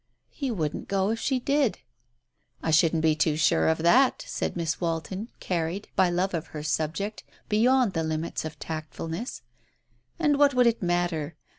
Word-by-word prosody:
"He 275 -3 -3
wouldn't 160 -10 -3
go 195 +1 +1
if 225 - -2
she 265 +1 0
did." 275 -2 +1 0.9
"I 160 - 0
shouldn't 160 0 +3
be 160 -1 +4
too 155 -1 +1
sure 80 - +3
of 80 - +3
that," 250 +10 +4
said - - -3
Miss 165 0 -2
Walton, 175 +6 -3
carried, 175 +2 -2
by 185 -1 +4
love 180 +2 0
of 165 -2 -3
her 150 -1 -7
subject, 160 +7 -2 0.3
beyond 240 +1 +3
the 165 - 0
limits 160 +1 -2
of 155 -1 -6
tactfulness. 160 - -5 0.7
"And 295 -4 +2
what 285 -2 +5
would 250 -1 +5
it 235 -1 +2
matter? 175 -3 -1
175 Hz, 165 wpm, -27 LUFS, 160-230 Hz, 0.9 s, what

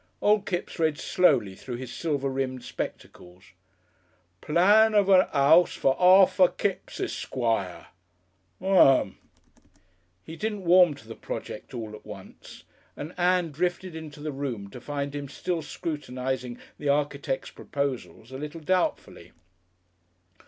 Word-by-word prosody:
Old 210 -1 +2
Kipps 175 -1 -4
read 155 -2 +1
slowly 135 - +2
through 120 +5 -7
his 120 0 -7
silver 145 -4 -2
rimmed 130 -1 -3
spectacles: 90 +1 -8 0.9
"Plan 210 +7 +4
of 200 -2 +4
a 185 -1 +5
'ouse 155 +5 +5
for 135 - +2
Arthur 185 0 +6
Kipps 195 +1 -4
Esquire 115 -8 -2 0.7
Um." 185 -9 +4 1.0
He 160 - -9
didn't 210 0 -4
warm 175 -3 +6
to 115 - -16
the 115 - -7
project - - -7
all 110 -3 -6
at 105 - -11
once, - - -12 0.3
and 155 +4 -7
Ann 180 -2 +1
drifted 175 +3 -2
into 155 -2 -9
the 155 0 -4
room 125 -8 -5
to 125 - -10
find 140 -1 -4
him 145 -1 -6
still 175 +2 -3
scrutinising 130 -5 -4 0.2
the 145 - -2
architect's 140 -2 -1
proposals 135 -4 -5
a 130 - -7
little 150 +3 -7
doubtfully. 180 +3 -2
145 Hz, 130 wpm, -26 LUFS, 130-180 Hz, 1.0 s, Arthur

